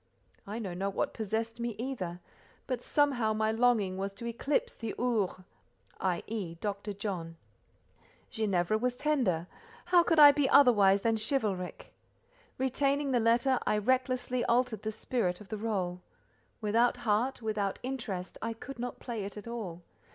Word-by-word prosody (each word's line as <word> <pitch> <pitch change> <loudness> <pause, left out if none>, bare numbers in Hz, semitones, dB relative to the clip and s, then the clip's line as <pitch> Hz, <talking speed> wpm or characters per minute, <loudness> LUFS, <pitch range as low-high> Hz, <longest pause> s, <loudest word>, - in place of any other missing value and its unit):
I 210 +3 -4
know 200 -6 -4
not 195 +2 -3
what - - -1
possessed 225 +2 -3
me 235 -2 -2
either; 195 -9 -4 0.4
but 255 -2 -3
somehow, 255 -8 +2
my 215 0 +1
longing 220 -5 +2
was 195 +1 -2
to 205 +4 -8
eclipse 295 - -1
the 225 - -5
"Ours," 220 -7 0 0.6
i.e., 185 0 -2
Dr. 200 +3 -4
John. 185 -5 -5 0.9
Ginevra 210 -2 +1
was 245 +1 -1
tender; 250 - +1 0.4
how 355 0 +6
could 335 -1 +1
I 295 -1 +11
be 285 -2 +1
otherwise 205 -9 +6
than 225 -1 +2
chivalric? 215 -6 -2 0.6
Retaining 275 +2 +1
the 245 - +3
letter, 235 +3 +3
I 210 - +3
recklessly 255 +2 0
altered 240 -3 +1
the 220 - -3
spirit 215 -4 -1
of 210 - -13
the 215 - -3
rôle. 190 -5 -2 0.6
Without 230 +4 +2
heart, 230 +4 +1
without 210 -3 -1
interest, 225 -8 -4
I 230 0 -2
could 245 +3 -9
not 245 +1 -4
play 230 -4 -4
it 200 +2 -7
at 210 - -8
all. 195 -8 -6
225 Hz, 150 wpm, -31 LUFS, 200-250 Hz, 0.9 s, I